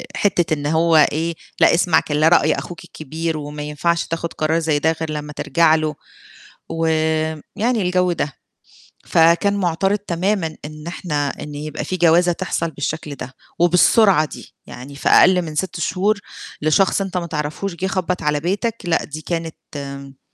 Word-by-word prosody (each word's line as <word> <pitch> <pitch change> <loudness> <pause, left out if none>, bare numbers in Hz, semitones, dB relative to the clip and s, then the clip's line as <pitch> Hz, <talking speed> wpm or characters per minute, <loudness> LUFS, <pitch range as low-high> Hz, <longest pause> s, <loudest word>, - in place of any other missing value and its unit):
حِتة 175 -5 +1
إن 145 -2 -3
هو 160 +2 +3 0.2
إيه 165 +2 -2 0.2
"لأ، - - +6
اسمع 170 -1 +4
كلا 150 +1 +1
رأي 175 - +4
أخوك 175 - -7
الكبير 160 +2 -4
وما 150 0 -6
ينفعش 165 +3 -1
تاخد 165 0 -4
قرار 155 +2 0
زي 155 -3 +1
ده، 160 +2 +2
غير 160 -1 -2
لمّا 150 0 -5
ترجع 165 +1 +3
له" 155 -1 -1 0.7
ويعني 160 +7 -1
الجو 180 0 +1
ده. 150 -4 -2 0.7
فكان 170 +5 +4
مُعترض 195 +2 +1
تمامًا 185 -3 -1
إن 155 +1 -9
إحنا 150 -5 -2
إن 145 +1 -7
يبقى 150 +1 -5
في 185 +5 -3
جوازة 175 +1 +4
تحصل 170 -2 -2
بالشكل 150 0 -4
ده 135 -1 -8 0.3
وبالسرعة 180 0 +5
دي، - - -11
يعني 135 +3 -10
في 140 - -1
أقل 180 0 +6
من 155 -3 -6
6 180 +1 -2
شهور 200 +5 0 0.4
لشخص 155 +6 +2
أنت 190 -2 -3
ما 170 -1 -2
تِعرفهوش 155 +4 -4
جِه 185 +3 -2
خبَّط 185 -1 -2
على 150 0 +1
بيتك، 205 +8 -1
لأ، 170 -2 +1
دي 155 +1 -7
كانت 140 -5 -6
165 Hz, 160 wpm, -20 LUFS, 150-180 Hz, 0.7 s, لأ